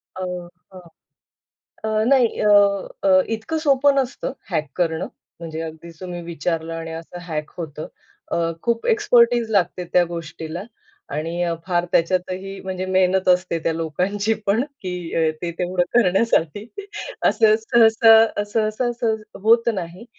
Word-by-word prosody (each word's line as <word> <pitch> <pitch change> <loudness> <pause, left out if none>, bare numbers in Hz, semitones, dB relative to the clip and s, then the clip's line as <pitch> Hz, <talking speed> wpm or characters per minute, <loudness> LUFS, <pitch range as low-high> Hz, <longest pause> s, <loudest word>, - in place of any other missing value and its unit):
अ, 185 - -6 0.5
हां. 185 -1 -11 1.0
अ, 215 0 +1
नाही 255 -4 +5
अ, 210 - +2 0.6
अ, 185 -1 +6
इतकं 320 +9 -4
सोपं 280 +1 +4
नसतं 270 0 -2 0.2
हॅक 155 -3 -1
करणं 165 -3 -1 0.3
म्हणजे 160 -1 -6
अगदी 160 +1 -8
तुम्ही 175 -2 -6
विचारलं 165 0 -3
आणि 165 0 -6
असं 165 +2 -8
हॅक 155 -2 -4
होतं. 155 -2 -6 0.4
अ, - - +1 0.2
खूप 235 -1 -1
एक्सपेर्टीज 240 - +3
लागते 180 -2 +1
त्या 180 - +6
गोष्टीला 165 +1 -6 0.5
आणि 165 +3 -3
अ, 170 -1 0
फार 175 -1 0
त्याच्यातही 185 +3 -1
म्हणजे 185 0 -4
मेहनत 185 0 +2
असते 180 -2 -2
त्या 165 - +1
लोकांची 185 +7 -1
पण 215 +6 +2 0.2
की 180 -1 -4 0.2
अ, 160 -1 +3
ते 170 -1 -3
तेवढं 180 0 +1
करण्यासाठी. 205 -3 +2 0.6
असं 215 -1 +5
सहसा 225 -1 +5
सहसा 215 +3 -1
सहज 225 -2 -1 0.2
होत 230 +1 +4
नाही. 185 +4 -6
185 Hz, 135 wpm, -21 LUFS, 170-220 Hz, 1.0 s, अ